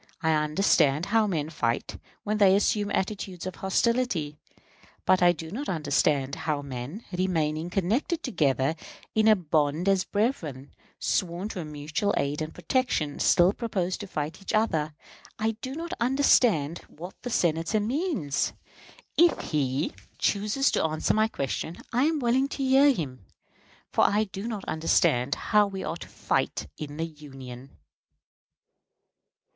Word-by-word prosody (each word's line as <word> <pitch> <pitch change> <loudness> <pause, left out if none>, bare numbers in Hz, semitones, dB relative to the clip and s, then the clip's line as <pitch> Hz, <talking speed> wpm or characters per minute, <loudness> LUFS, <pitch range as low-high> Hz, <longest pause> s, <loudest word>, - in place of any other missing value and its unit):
I 160 - +3
understand 155 -1 +3
how 220 +1 +2
men 160 -5 -2
fight 115 -7 -2 0.2
when 210 +1 -1
they 195 -2 +6
assume 205 0 +1
attitudes 190 -3 -3
of 185 - -5
hostility; 190 -6 0 0.7
but 185 0 +4
I 175 0 +7
do 160 -1 -7
not 270 +8 -4
understand 145 -4 +1
how 150 -2 -2
men, 140 - -6
remaining 165 -3 0
connected 220 - 0
together 140 - +1 0.4
in 220 0 +3
a 215 - +7
bond 155 -1 0
as 195 -1 +3
brethren, 165 - -2 0.3
sworn 185 +2 -1
to 180 -5 -5
mutual 155 +7 -2
aid 145 +2 -1
and 155 0 -3
protection, 165 - -1
still 175 +3 +5
propose 190 -7 -2
to 205 - -7
fight 155 0 -4
each 195 - -5
other. 155 -9 +1 0.4
I 220 0 +1
do 260 +1 -5
not 335 +2 -5
understand 235 - +3
what 175 +4 -9
the 245 - -5
Senator 170 0 +1
means. 240 - -1 0.7
If 345 0 +3
he 140 0 0 0.2
chooses 210 +7 +1
to - - +1
answer 155 -1 +1
my 215 0 +3
question, 160 - -4 0.2
I 250 +4 +3
am 320 0 +2
willing 260 +1 +2
to 275 - -4
hear 270 +2 +6
him, 130 - -5 0.6
for - - +3
I 210 +2 +3
do 195 +1 -6
not 215 -4 -4
understand 155 -4 +2
how 210 -1 +3
we 195 -1 -5
are 165 - -3
to - - -10
fight - - -1
in 145 -1 -7
the 165 - -1
Union. 135 -4 -11
180 Hz, 145 wpm, -27 LUFS, 150-215 Hz, 0.7 s, I